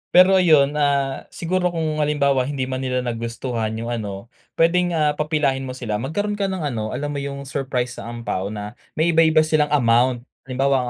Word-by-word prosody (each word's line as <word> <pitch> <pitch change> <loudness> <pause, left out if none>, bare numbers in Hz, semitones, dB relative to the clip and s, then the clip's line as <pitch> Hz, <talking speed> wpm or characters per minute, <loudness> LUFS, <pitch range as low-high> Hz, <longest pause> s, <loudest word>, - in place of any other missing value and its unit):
Pero 185 +1 +8
ayun, 150 -5 +5
ah, 140 -2 0
siguro 180 +1 -1
kung 160 -3 -2
halimbawa 140 -3 +2
hindi 135 -3 -2
man 130 0 -4
nila 125 -1 -1
nagustuhan 115 -1 -3
'yung 115 +1 -4
ano, 100 -3 -5 0.3
puwedeng, 175 +2 +3
ah, 150 -2 +2
papilahin 145 -3 0
mo 130 - -5
sila, 110 -5 -3
magkaroon 205 - -2
ka 195 -1 0
ng 190 -4 -3
ano, 110 -6 -2
alam 145 +3 -3
mo 140 - -3
'yung 140 0 -5
surprise 130 -3 -2
sa 115 - -7
ampao 115 -5 -3
na 105 0 -6 0.2
may 165 +2 +3
iba-ibang 160 -1 +5
silang 155 -1 +2
amount. 120 -2 +2 0.2
Halimbawa, 130 -1 +1
140 Hz, 180 wpm, -22 LUFS, 120-155 Hz, 0.3 s, Pero